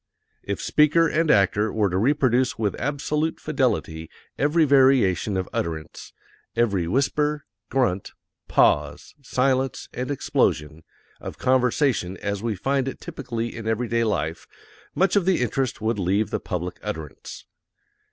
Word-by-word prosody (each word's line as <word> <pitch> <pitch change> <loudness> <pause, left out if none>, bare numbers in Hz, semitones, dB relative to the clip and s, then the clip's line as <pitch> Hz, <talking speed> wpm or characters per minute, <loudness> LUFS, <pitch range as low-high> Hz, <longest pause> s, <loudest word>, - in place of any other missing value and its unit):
If 100 - -4
speaker 155 +2 +3
and 160 +1 0
actor 105 +1 +3
were 105 -4 +1
to 90 - 0
reproduce 130 0 +2
with 105 -3 0
absolute 150 +2 -1
fidelity 120 - -1 0.3
every 155 +3 +2
variation 130 -8 +3
of 95 - -2
utterance 80 -2 -4 0.4
every 100 -7 +1
whisper, 150 - 0 0.2
grunt, 120 -9 0 0.3
pause, - - +2
silence, 130 0 0
and 125 +2 -4
explosion 80 - 0 0.4
of - - -8
conversation 125 - +1
as 100 -1 -3
we 115 -2 -2
find 135 +6 0
it 135 - -5
typically 120 -8 -5
in 115 -1 -6
everyday 115 +1 0
life, 95 -7 -2 0.5
much 190 +1 +2
of 200 -4 +3
the 190 -2 +2
interest 125 0 -1
would 110 -1 -1
leave 100 +3 0
the - - -1
public 90 0 -5
utterance. 75 -4 -7
120 Hz, 130 wpm, -24 LUFS, 100-140 Hz, 0.5 s, speaker